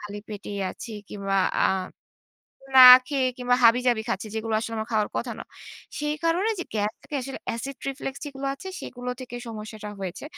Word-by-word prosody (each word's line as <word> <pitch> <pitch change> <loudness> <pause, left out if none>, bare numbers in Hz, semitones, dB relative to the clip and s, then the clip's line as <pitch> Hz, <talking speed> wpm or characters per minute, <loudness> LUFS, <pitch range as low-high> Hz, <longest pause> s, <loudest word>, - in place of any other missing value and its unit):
খালি 205 0 -7
পেটেই 205 -1 -6
আছি 235 - -9 0.2
কিংবা 195 -1 -2 0.3
আ - - +6 1.1
না - - +11 0.3
খেয়ে 270 -2 0
কিংবা 245 0 +2
হাবি-জাবি 240 -1 +4
খাচ্ছি। 230 - -2
যেগুলো 220 0 -2
আসলে 230 +1 -4
আমার 220 0 -4
খাওয়ার 215 -1 +2
কথা 235 -1 -2
না। - - -7 0.5
সেই 295 0 -1
কারণে 350 +6 +2
যে, 355 - -3
গ্যাস 210 0 0
থেকে 295 - -5 0.4
acid 270 +4 -5
reflux 270 0 -4
যেগুলো 275 -1 -6
আছে 375 +8 -9
সেগুলো 250 0 -6
থেকে 245 -1 -7
সমস্যাটা 215 -1 -7
হয়েছে। 185 +4 -5
235 Hz, 170 wpm, -25 LUFS, 215-270 Hz, 1.1 s, না